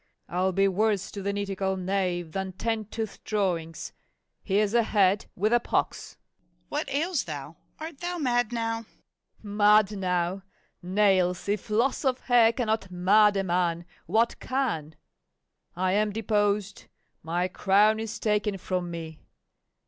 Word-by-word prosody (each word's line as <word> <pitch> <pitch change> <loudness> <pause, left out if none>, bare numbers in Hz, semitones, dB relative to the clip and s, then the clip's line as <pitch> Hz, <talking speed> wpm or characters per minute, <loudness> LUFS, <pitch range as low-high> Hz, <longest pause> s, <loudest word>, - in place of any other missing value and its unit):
I'll 185 +2 0
be 195 +2 +3
worse 200 0 0
to 200 - -6
the 200 +1 -1
nitticall 195 -1 -2
knave 180 -3 -1
than 190 0 -4
ten 225 +2 -2
tooth 220 0 -6
drawings. 175 -6 -2 0.5
Here's 205 +1 +1
a 235 - +5
head, 205 -2 +2
with 215 +5 +1
a 240 - +5
pox! - - -2 0.2
MORRIS. - - -42
What - - -2
ails 305 +3 0
thou? 150 0 -7 0.2
art 315 -2 -8
thou 350 0 -3
mad 245 -6 +1
now? 225 -1 -2 0.6
FAULKNER. 205 -1 -7
Mad 210 0 +5
now! 185 -1 -1 0.4
nails, 185 -1 +2
if 205 0 -2
loss 235 +8 +1
of 260 -2 0
hair 240 -3 +5
cannot 220 -4 -1
mad 200 +3 +4
a 195 - +1
man, 175 -2 0 0.2
what 225 +5 +1
can? 215 - -2 0.8
I 185 +1 0
am 210 +2 +2
deposed, 205 -2 0 0.4
my 175 +3 -1
crown 210 +3 +3
is 225 0 -4
taken 210 -2 0
from 180 -1 -3
me. 165 -2 -7
200 Hz, 145 wpm, -27 LUFS, 185-220 Hz, 0.8 s, a